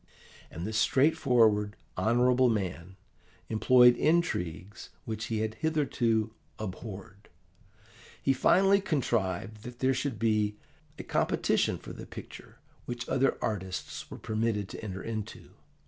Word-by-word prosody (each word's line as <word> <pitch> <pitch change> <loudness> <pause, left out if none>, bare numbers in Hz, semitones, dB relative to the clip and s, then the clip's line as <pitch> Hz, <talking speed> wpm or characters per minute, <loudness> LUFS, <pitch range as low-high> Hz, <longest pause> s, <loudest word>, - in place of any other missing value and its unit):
"And 85 +3 -6
this 110 +1 -1
straightforward, 120 -7 +3 0.2
honourable 125 +2 +3
man 95 -4 -3 0.5
employed 125 +2 +6
intrigues 100 - -1 0.2
which 110 0 -4
he 110 -2 -2
had 110 0 -2
hitherto 120 -8 0 0.2
abhorred. 100 -1 -8 0.9
He 135 - +2
finally 195 +8 +4
contrived 110 - -1
that 120 +2 -9
there 130 +1 +2
should 130 -2 -2
be 105 -2 +1 0.4
a - - -6
competition - - +1
for - - -10
the - - -9
picture - - -11 0.3
which 120 0 -5
other 135 +1 +2
artists 95 -3 -4
were - - -8
permitted 110 -2 -1
to - - -8
enter 95 -3 -5
into. 110 -2 -6
110 Hz, 120 wpm, -29 LUFS, 105-125 Hz, 0.9 s, employed